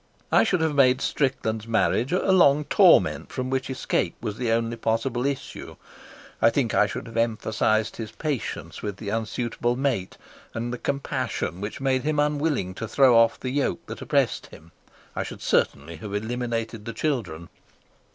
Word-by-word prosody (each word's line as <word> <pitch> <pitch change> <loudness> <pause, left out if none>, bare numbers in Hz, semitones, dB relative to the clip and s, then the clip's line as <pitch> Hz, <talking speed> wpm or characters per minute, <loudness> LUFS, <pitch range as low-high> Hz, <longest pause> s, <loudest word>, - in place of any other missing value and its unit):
I - - +6
should 180 -3 +1
have 160 -2 +1
made 130 -2 +4
Strickland's 115 -7 -1
marriage 115 +4 +1
a 185 +2 +2
long 150 -6 +5
torment - - +4
from 130 0 -3
which 130 0 -1
escape 130 - -1
was 105 0 -4
the 120 -2 -1
only 115 0 0
possible 115 +3 -1
issue. 140 -2 -5 0.7
I - - +6
think - - 0
I - - +4
should - - -6
have 115 -1 -8
emphasised 110 -1 0
his 110 -2 -6
patience 145 +1 -4
with 105 -2 -4
the 100 - -6
unsuitable 115 +2 -1
mate, 130 -8 -1 0.4
and 120 +1 -3
the 125 - -5
compassion 135 - -2
which 105 +1 -5
made 135 -1 +1
him 150 +2 -1
unwilling 145 - 0
to 115 - -2
throw 130 +1 +5
off 115 0 +4
the 130 - -3
yoke 140 0 -1
that - - -8
oppressed - - 0
him. 80 +2 -15 0.4
I - - -1
should - - -7
certainly 80 +4 0
have 100 +5 -6
eliminated 115 0 -3
the 115 - -5
children. 110 - -3
115 Hz, 170 wpm, -25 LUFS, 110-135 Hz, 0.7 s, I